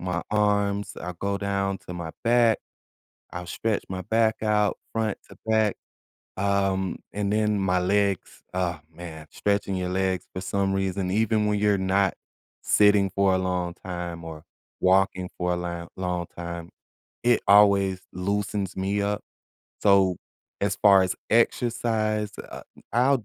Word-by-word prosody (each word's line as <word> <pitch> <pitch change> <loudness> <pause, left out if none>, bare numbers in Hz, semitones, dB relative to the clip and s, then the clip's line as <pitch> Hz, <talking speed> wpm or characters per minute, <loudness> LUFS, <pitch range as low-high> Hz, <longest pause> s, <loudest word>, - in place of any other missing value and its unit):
my 90 -1 -2
arms, 100 -1 +1
I 90 - -4
go 100 0 -1
down 100 -1 -1
to 90 - -6
my 85 -2 -5
back. 115 -1 +4 0.7
I'll 90 0 -6
stretch 105 +4 -1
my 95 0 -4
back 110 +2 +2
out 105 -1 +2
front 110 -2 -1
to - - -13
back. 110 -2 +2 0.6
Um, 95 -1 0
and 100 -1 -1
then 105 -1 +2
my 90 -1 +2
legs, 100 0 0
ah 90 -3 -1
man, 80 -2 -9
stretching 100 -1 0
your 90 -1 -2
legs 95 0 0
for 95 - -3
some 95 +1 0
reason, 95 -1 -1
even 110 +1 +2
when 105 0 +1
you're 105 -1 +3
not 95 0 +2 0.5
sitting 105 -1 +4
for 100 0 +2
a - - +2
long 90 -1 -1
time 85 -2 -5
or 80 -1 -8 0.4
walking 95 0 +3
for 90 0 0
a 90 - 0
lang 85 -1 -4
long 90 -2 -2
time, 85 -1 -6 0.5
it 120 -1 +4
always 100 -2 +5
loosens 100 +1 -2
me 100 +2 0
up. 100 +1 -1 0.6
So, 95 -3 +4 0.4
as - - +1
far 100 -2 +6
as 95 0 0 0.2
exercise, 110 -2 +1
uh, - - -8 0.3
I'll 125 0 +3
100 Hz, 145 wpm, -26 LUFS, 90-105 Hz, 0.7 s, far